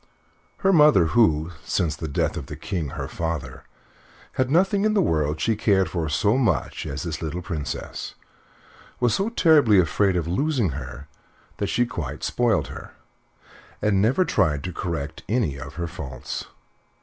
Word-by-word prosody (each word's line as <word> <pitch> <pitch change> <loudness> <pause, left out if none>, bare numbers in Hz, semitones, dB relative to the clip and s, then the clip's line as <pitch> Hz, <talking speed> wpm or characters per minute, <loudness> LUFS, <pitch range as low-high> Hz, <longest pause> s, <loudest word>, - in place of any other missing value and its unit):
Her 195 0 +2
mother, 150 - +6
who, 85 -8 +3
since 80 -3 0
the 80 +1 -5
death 70 - -1
of - - -6
the - - -6
King, 85 -6 -3
her - - -3
father, 85 -1 -4 0.7
had 130 -1 0
nothing 190 +6 +3
in 215 0 +2
the - - +4
world 75 - 0
she 115 - +1
cared 100 -3 +2
for 80 -4 -2
so 105 - +2
much 95 - 0
as - - -4
this 85 -2 -4
little 85 +2 -4
Princess, 80 -6 -5 0.8
was 120 -3 +2
so 195 - 0
terribly 155 - +5
afraid 95 +3 +2
of 85 -2 -1
losing 125 - +1
her 65 0 -7 0.5
that - - -1
she 120 - +2
quite 85 - -5
spoiled 120 -3 +1
her, - - -10 0.8
and 100 -2 +2
never 130 - +3
tried 75 - +1
to 90 - -4
correct 80 -4 -4
any 105 - 0
of 65 +2 -9
her 85 0 -3
faults. 65 -5 -6
90 Hz, 160 wpm, -24 LUFS, 80-120 Hz, 0.8 s, mother